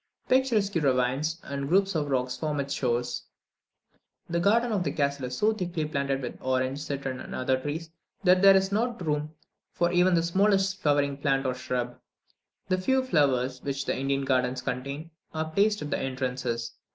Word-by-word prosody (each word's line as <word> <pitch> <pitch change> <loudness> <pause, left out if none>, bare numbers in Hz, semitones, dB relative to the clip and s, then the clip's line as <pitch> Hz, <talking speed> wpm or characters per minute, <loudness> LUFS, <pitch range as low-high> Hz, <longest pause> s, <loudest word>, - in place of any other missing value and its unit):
Picturesque 235 -6 +2
ravines 135 +4 +1
and 140 0 -4
groups 195 +3 +3
of 150 -3 -1
rock 130 -2 0
form 145 +3 -2
its 140 0 -2
shores. 120 -1 -1 1.0
The 170 0 -1
garden 230 +6 +3
of 200 -4 +1
the - - -1
castle 140 -2 -1
is 125 0 -5
so 215 +1 +3
thickly 175 -6 -2
planted 140 -3 -1
with 120 - -6
orange, 130 +1 0
citron, 140 -3 -4
and - - -7
other 130 +1 +1
trees, 155 +4 -5 0.3
that 185 -1 +5
there 195 0 +8
is 190 0 +2
not 230 -2 -1
room 150 0 -2 0.4
for 175 0 +1
even 180 0 +4
the 165 - +2
smallest 195 +2 +2
flowering 145 -2 +2
plant 140 -1 +1
or 130 - +1
shrub. 125 -1 -3 0.7
The 185 -1 +1
few 265 +6 +2
flowers 135 - +1
which 140 -1 -3
the - - 0
Indian 135 +1 -1
gardens 125 -1 +1
contain, 140 +6 -4 0.2
are 160 0 -2
placed 205 +2 +2
at 150 - -6
the - - 0
entrances. 130 -3 -3
145 Hz, 175 wpm, -27 LUFS, 130-185 Hz, 1.0 s, there